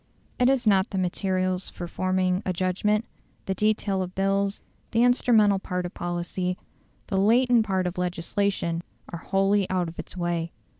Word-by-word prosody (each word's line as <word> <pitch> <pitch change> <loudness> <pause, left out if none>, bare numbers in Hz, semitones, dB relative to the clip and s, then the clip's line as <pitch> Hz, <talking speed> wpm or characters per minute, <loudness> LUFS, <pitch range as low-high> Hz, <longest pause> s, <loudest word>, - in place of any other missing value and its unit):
It 250 - +4
has 265 -2 +2
not 195 -2 +3
the 195 - -4
materials 185 0 0
for 175 - -7
forming 185 +1 0
a 185 - -1
judgment: 195 +5 0 0.4
the 190 - -1
detail 205 -1 0
of 185 0 -5
bills, 195 +1 0 0.3
the 230 +1 +2
instrumental 225 -5 +4
part 180 -1 -3
of 175 - -6
policy, 175 +1 -3 0.5
the 195 - -2
latent 235 +2 +4
part 190 -2 0
of 180 0 -3
legislation, 180 0 -1 0.3
are 170 - -6
wholly 195 +2 +1
out 185 -2 0
of 165 - -12
its - - -7
way. 170 -1 -2
190 Hz, 160 wpm, -26 LUFS, 180-205 Hz, 0.5 s, It